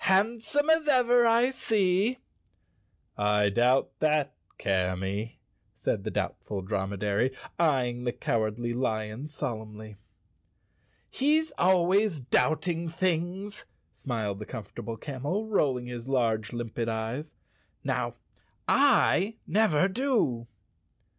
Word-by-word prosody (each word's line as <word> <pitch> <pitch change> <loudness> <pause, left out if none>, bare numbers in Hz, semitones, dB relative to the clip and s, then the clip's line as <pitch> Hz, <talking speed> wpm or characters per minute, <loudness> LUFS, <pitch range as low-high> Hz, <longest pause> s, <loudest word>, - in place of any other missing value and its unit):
"Handsome 230 +9 +2
as 320 -1 +3
ever, 245 -3 +5
I 235 +3 +4
see." 210 -1 +1 0.5
" - - -42
I 105 0 +3
doubt 125 +6 +2
that, 150 -3 +1 0.2
Camy," 95 +3 -1 0.4
said - - -2
the - - -2
Doubtful 100 -3 -3
Dromedary, 100 +3 -1 0.3
eying 125 -7 +1
the 120 - 0
Cowardly 115 +1 -1
Lion 110 +1 -2
solemnly. 110 -7 -6 1.1
"He's 310 +4 +2
always 185 0 +3
doubting 160 +6 +1
things," 185 +4 -2 0.3
smiled 110 -6 -3
the 105 - -7
Comfort¬ 110 -6 -8
able 115 -1 -5
Camel, 145 - -3
rolling 135 - +1
his 120 +1 -7
large, 115 -5 +1
limpid 120 -1 -3
eyes. 115 +7 -4 0.5
"Now, - - -1 0.5
I 225 -6 +4
never 190 -5 +3
do." 195 - 0
135 Hz, 105 wpm, -28 LUFS, -, 1.1 s, ever